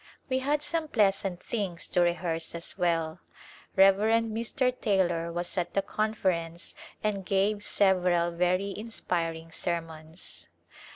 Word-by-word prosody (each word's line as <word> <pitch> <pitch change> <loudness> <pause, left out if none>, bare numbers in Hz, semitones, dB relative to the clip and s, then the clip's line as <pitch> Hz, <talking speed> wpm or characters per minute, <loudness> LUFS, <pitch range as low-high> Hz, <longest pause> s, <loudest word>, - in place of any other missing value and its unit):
We 260 0 +2
had 290 +3 0
some 325 +1 -1
pleasant 195 -6 +1
things 195 -7 -2
to 180 - +2
rehearse 170 -1 0
as 170 - -3
well. 165 -3 0 0.6
Rev. 195 0 +7
Mr. 230 +4 +1
Taylor 175 -5 +1
was 175 +2 -1
at 175 - -3
the 195 - +2
Conference 185 -6 -1 0.3
and 205 -2 0
gave 200 +2 +1
several 180 -4 +3
very 180 +3 +1
inspiring 165 -7 -3
sermons. 165 -1 -4
185 Hz, 120 wpm, -29 LUFS, 170-210 Hz, 0.6 s, Rev